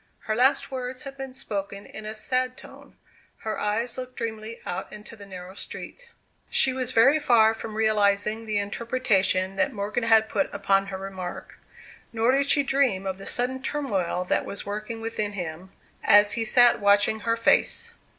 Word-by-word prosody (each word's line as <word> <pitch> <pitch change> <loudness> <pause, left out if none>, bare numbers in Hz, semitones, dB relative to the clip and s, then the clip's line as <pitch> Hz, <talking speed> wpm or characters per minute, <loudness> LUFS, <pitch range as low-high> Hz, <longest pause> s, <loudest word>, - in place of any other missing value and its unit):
Her 215 - -2
last 260 +4 +2
words 255 0 -5
had 275 -1 -8
been 270 -1 -7
spoken 200 -3 -5
in 215 - -9
a 215 - -5
sad 255 +3 -1
tone; - - -14 0.5
her 220 -1 -3
eyes 230 +4 -2
looked 255 0 -8
dreamily 225 0 -5
out - - -5
into 210 +1 -10
the 200 -2 -13
narrow 185 -1 -9
street. - - -8 0.4
She 260 - +4
was 255 -1 -1
very 270 +6 +5
far 225 -6 +4
from 220 -1 -7
realizing 215 0 +1
the 215 -1 -1
interpretation 200 -3 0
that 195 +7 +1
Morgan 210 +3 -2
had 220 -1 +5
put 285 - -1
upon 195 -1 +1
her 195 -1 -5
remark. 190 -2 -7 0.5
Nor 230 +1 +2
did 275 +1 +1
she 285 -1 +4
dream 270 -9 +1
of 190 0 -4
the 195 - -9
sudden 255 +2 -1
turmoil 205 -12 -2
that - - +1
was 200 - -6
working 215 +3 -5
within 215 -2 -3
him, 180 0 -6 0.3
as 205 0 +6
he 230 -1 -1
sat 245 +2 +6
watching 205 +1 +3
her 230 +2 -1
face. 230 - +2
220 Hz, 175 wpm, -25 LUFS, 200-250 Hz, 0.5 s, as